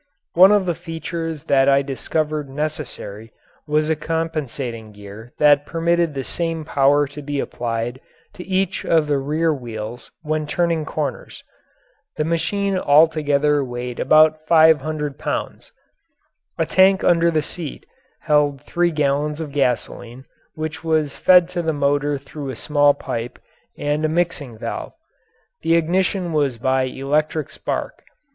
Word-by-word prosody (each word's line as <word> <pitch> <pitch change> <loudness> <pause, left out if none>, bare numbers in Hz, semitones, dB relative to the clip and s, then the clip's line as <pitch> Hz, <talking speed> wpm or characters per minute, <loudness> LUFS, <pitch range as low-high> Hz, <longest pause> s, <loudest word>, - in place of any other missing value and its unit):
One 185 +3 +7
of 205 -2 +3
the 175 - 0
features 165 -2 -5
that 135 0 +3
I 140 0 +4
discovered 150 +2 -2
necessary 135 -7 -5 0.4
was 150 +1 +1
a 160 - +1
compensating 145 -8 -4
gear 105 +3 -11
that 145 -1 +5
permitted 170 -1 0
the 135 - -3
same 165 0 -3
power 145 0 +3
to 145 +1 -9
be 145 0 -3
applied 120 +1 -3 0.3
to 180 - -9
each 190 -1 -1
of 160 -2 +2
the 145 -2 0
rear 155 +4 0
wheels 120 -3 -7
when 155 -1 -2
turning 165 0 0
corners. 150 -3 -5 0.7
The 155 - +1
machine 190 +4 0
altogether 150 -2 +3
weighed 125 -1 -6
about 155 0 +4
five 160 -2 +6
hundred 150 -1 -4
pounds. - - -4 0.9
A - - +1
tank 190 0 +4
under 170 -1 +4
the 155 -2 0
seat 160 -1 -6 0.4
held 145 -2 +2
three 175 +3 +1
gallons 150 0 0
of 155 -3 -5
gasoline 125 -2 -2 0.3
which 155 +1 -5
was 155 -3 0
fed 180 -2 +5
to 180 -1 -2
the 160 -1 -1
motor 145 0 +1
through 140 +1 -8
a 130 - -5
small 145 +3 +3
pipe 120 +2 -5 0.4
and 145 +1 -1
a 155 - +2
mixing 160 -8 -2
valve. - - -5 0.7
The 165 +1 +2
ignition 175 +1 0
was 140 -5 +1
by 130 +2 +1
electric 150 +4 -1
spark. - - -4
150 Hz, 140 wpm, -21 LUFS, 140-165 Hz, 0.9 s, One